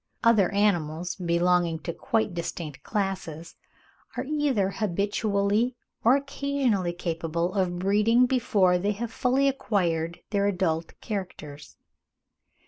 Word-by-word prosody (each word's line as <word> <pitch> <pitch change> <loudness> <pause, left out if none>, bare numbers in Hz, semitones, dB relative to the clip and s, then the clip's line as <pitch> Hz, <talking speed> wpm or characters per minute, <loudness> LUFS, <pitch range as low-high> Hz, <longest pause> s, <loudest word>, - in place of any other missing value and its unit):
(39. 230 -1 +6
Other 200 -5 +2
animals, 175 -4 +1
belonging 175 -1 +1
to 165 +2 -5
quite 215 +3 -1
distinct 165 -4 -5
classes, 190 -6 -3 0.6
are - - -1
either 275 -9 0
habitually 205 +3 0 0.3
or 240 +4 +6
occasionally 275 -9 0
capable 170 0 -2
of 185 -3 0
breeding 210 +6 +3
before 205 -8 +2
they 205 +3 0
have 230 +2 -5
fully 260 +2 +2
acquired 175 -10 -1
their 200 -1 +2
adult 170 -4 -1
characters. 150 - -6
195 Hz, 115 wpm, -26 LUFS, 170-225 Hz, 0.6 s, 39